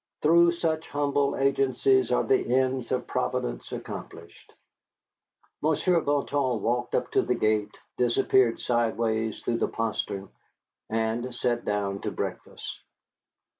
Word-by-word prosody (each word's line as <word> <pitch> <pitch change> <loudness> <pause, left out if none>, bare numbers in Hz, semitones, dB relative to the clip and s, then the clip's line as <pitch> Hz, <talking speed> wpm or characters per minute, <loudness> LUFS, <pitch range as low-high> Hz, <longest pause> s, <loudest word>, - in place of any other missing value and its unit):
Through 170 +2 +6
such 160 -2 -2
humble 145 -1 +1
agencies 135 -1 +2
are 125 - +3
the 130 -2 +1
ends 130 -2 0
of 125 -1 0
Providence - - -2
accomplished. - - -9 1.1
Monsieur 165 +3 +2
Bouton 140 -4 0
walked 120 +3 -1
up - - -1
to - - +3
the 125 - 0
gate, 110 -2 0 0.2
disappeared 125 0 +3
sidewise 115 -2 0
through 115 -1 -1
the - - +1
postern, 105 -3 -3 0.6
and 115 +2 -1
we 125 - -6
sat 120 -1 -1
down 100 -1 -1
to - - -2
breakfast. - - -6
125 Hz, 125 wpm, -27 LUFS, 115-140 Hz, 1.1 s, Through